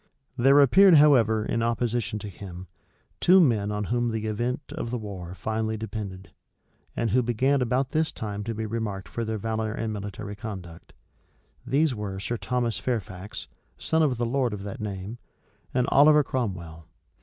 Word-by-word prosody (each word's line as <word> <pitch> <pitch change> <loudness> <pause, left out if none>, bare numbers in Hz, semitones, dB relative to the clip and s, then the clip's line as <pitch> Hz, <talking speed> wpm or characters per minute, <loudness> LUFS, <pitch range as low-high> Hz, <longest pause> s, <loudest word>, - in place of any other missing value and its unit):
There 135 +3 +5
appeared, 190 +6 +7
however, 115 -8 +5
in 115 - -1
opposition 115 -2 -1
to 105 - -7
him, 95 -2 -9 0.5
two 185 +2 +6
men 110 - +3
on 105 0 -2
whom 120 +3 0
the 110 -1 -3
event 120 +5 -1
of 150 -6 -4
the 125 - -2
war 95 -5 -7
finally 110 +3 -2
depended, 105 -4 -6 0.6
and 115 -3 0
who 125 +4 +4
began 130 +4 +1
about 125 +2 0
this 155 0 +1
time 105 -1 -5
to 115 0 -3
be 110 +1 -3
remarked 105 -3 -4
for 115 - -4
their 110 0 -2
valor 110 +1 -2
and 110 0 -3
military 105 0 -6
conduct. 95 -5 -8 0.7
These 140 +3 +2
were 100 -4 -5
Sir 120 +4 -3
Thomas 120 -4 -1
Fairfax, 100 -4 -4 0.3
son 160 0 +1
of 140 -6 +2
the 120 - 0
lord 125 -2 0
of 100 - -8
that 100 0 -6
name, 100 +2 -5 0.5
and 125 -1 +1
Oliver 150 +2 +6
Cromwell. 85 - -4
110 Hz, 165 wpm, -26 LUFS, 100-125 Hz, 0.7 s, appeared